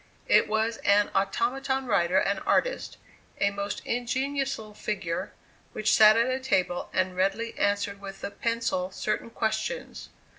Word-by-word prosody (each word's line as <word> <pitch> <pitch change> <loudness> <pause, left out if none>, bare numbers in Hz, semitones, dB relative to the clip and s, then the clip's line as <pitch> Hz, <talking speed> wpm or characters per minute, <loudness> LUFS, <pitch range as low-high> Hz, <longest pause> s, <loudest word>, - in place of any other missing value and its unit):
It - - +5
was 220 +1 0
an 205 0 +3
automaton 260 +7 0
writer 190 -5 +2
and 195 0 +1
artist, - - 0 0.4
a 200 - +2
most 200 0 -4
ingenious 270 +3 -1
little 215 -1 -11
figure, 190 -5 -3 0.4
which 215 0 +1
sat 215 0 +7
at 230 - +4
a 255 +1 -1
table, 190 -9 0
and 185 0 0
readily 195 +5 0
answered 200 0 0
with 195 -1 -9
the 200 - -4
pencil 230 -5 -1
certain 215 +4 -3
questions. 225 - -3
215 Hz, 145 wpm, -27 LUFS, 195-235 Hz, 0.4 s, sat